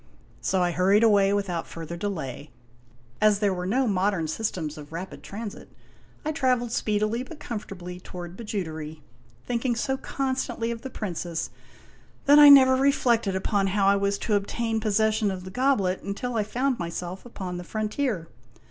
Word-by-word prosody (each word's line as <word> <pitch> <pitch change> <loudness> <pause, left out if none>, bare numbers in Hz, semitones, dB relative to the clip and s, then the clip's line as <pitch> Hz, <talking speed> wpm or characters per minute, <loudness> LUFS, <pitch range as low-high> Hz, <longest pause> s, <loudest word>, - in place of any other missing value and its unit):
So 190 -1 +1
I 175 - +1
hurried 195 +5 +3
away 200 -3 +5
without 195 -5 -1
further 165 0 -7
delay. 160 -7 -4 0.7
As 210 -1 +5
there 200 -1 +1
were 180 0 -3
no 255 +7 +2
modern 190 -4 +1
systems 160 -3 -3
of 150 -1 -11
rapid 165 -3 -6
transit, 205 +8 -7 0.6
I 310 - 0
traveled 255 -5 +1
speedily 215 +1 0
but 295 +4 -9
comfortably 180 -7 -6
toward 175 -1 -8
Bijoutery, 160 -8 -5 0.4
thinking 240 0 0
so 265 +3 -1
constantly 260 -4 -2
of 230 -1 -5
the 265 - -6
Princess 175 -7 -4 0.7
that 290 +1 +7
I 295 -1 +10
never 260 -2 +9
reflected 245 -7 +2
upon 195 +1 +1
how 195 +1 +1
I 200 +1 +5
was 200 0 0
to 220 - 0
obtain 225 +3 0
pos 215 -2 -1
session 220 0 +2
of 185 -2 -4
the 185 - -8
goblet 210 -6 +1
until 220 +5 -4
I 220 - +2
found 255 +4 -1
myself 175 +2 -5
upon 190 -7 -6
the 175 - -6
frontier. 215 - -2
205 Hz, 165 wpm, -26 LUFS, 180-235 Hz, 0.7 s, I